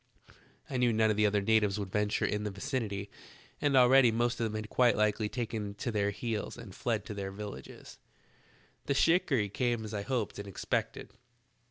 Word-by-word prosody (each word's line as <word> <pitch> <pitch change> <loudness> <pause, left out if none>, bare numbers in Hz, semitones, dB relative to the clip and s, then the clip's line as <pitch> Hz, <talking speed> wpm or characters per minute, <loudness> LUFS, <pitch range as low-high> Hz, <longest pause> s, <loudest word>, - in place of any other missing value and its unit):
I 130 - -3
knew 125 -1 +3
none 110 -1 +3
of - - 0
the 105 0 +3
other 100 -1 +1
natives 105 -1 +2
would 100 -2 -5
venture 105 0 0
in 105 0 -1
the 105 - -2
vicinity, 100 -2 -4 0.5
and 140 -2 +3
already 125 0 +7
the 115 - -2
most 120 0 0
of 115 - +1
them 110 -1 -3
had 110 0 -4
quite 125 +2 +3
likely 105 0 +1
taken 110 -4 -4
to 120 - -3
their 100 -2 +1
heels 110 +1 -4
and - - -10
fled - - -2
to - - -6
their 100 -1 -4
villages. 100 -8 -9 0.9
"The 140 - +1
shikarry 140 - +3
came 120 +1 -1
as 110 - -7
I 105 - -2
hoped 115 -1 -2
and 100 - -6
expected. 100 - -3
110 Hz, 195 wpm, -31 LUFS, 105-120 Hz, 0.9 s, already